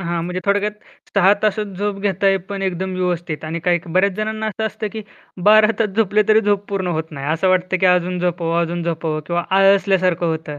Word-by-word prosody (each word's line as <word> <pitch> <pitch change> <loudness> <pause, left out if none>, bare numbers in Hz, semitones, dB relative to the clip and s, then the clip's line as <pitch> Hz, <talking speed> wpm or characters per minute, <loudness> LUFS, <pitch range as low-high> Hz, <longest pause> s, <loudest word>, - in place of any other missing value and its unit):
हां, 170 -2 -2
म्हणजे 180 +1 -4
थोडक्यात 205 +1 +1 0.4
6 200 0 +5
तासच 215 0 0
झोप 205 -1 -2
घेताय, 195 0 +1
पण 200 -1 -4
एकदम 190 0 -2
व्यवस्थित. 175 -4 -3
आणि 165 +1 -4
काहिक 175 0 0
बऱ्याच 190 +1 +3
जणांना 220 0 -3
असं 220 +1 -2
असतं 220 0 -5
की 220 - -6 0.5
12 215 0 +6
तास 225 - +1
झोपले 215 -1 +3
तरी 215 0 +5
झोप 205 -1 0
पूर्ण 195 -2 -2
होत 160 -1 -3
नाही. 140 -2 -6
असं 165 +4 +1
वाटतं 185 0 +1
की 190 - +4
अजून 180 0 +2
झोपावं 170 -1 -1
अजून 170 +1 -3
झोपावं, 160 -2 -2
किंवा 175 0 -1
आळसल्यासारखं 190 -2 +3
होतं. 160 -2 -4
185 Hz, 200 wpm, -19 LUFS, 170-200 Hz, 0.5 s, 12